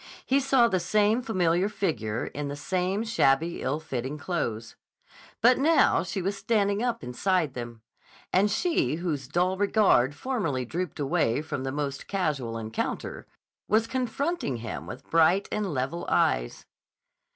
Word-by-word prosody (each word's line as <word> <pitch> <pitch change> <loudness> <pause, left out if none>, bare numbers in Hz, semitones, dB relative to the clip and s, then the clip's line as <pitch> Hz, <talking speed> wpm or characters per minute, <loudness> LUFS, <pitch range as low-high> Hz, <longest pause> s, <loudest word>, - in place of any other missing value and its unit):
He 270 +2 +3
saw 265 -3 +4
the 190 -5 +1
same 215 +5 +2
familiar 185 -4 +1
figure 120 - -2
in 145 0 -5
the 140 - -4
same 185 +6 -1
shabby, 170 -7 +1
ill 145 +4 -1
fitting 135 -1 -4
clothes. 120 -9 -3 0.7
But 245 +3 +5
now 315 +4 +4
she 190 +1 -4
was 195 +2 -1
standing 200 0 +1
up 235 -1 -1
inside 160 +3 0
them. 120 -3 -7 0.5
And 200 +3 +4
she, 330 - +1
whose 155 -6 -3
dull 180 +5 +1
regard 195 - +3
formerly 165 - -2
drooped 175 +6 -4
away 135 -1 +1
from 145 -4 -4
the 135 - -2
most 140 -1 -4
casual 145 -12 -1
encounter, 110 0 -4 0.4
was 220 +2 +3
confronting 260 - -2
him 115 -1 -6
with 130 +3 -9
bright 165 +4 +3
and 210 -3 -1
level 135 +5 -3
eyes. - - +1
175 Hz, 145 wpm, -27 LUFS, 135-210 Hz, 0.7 s, But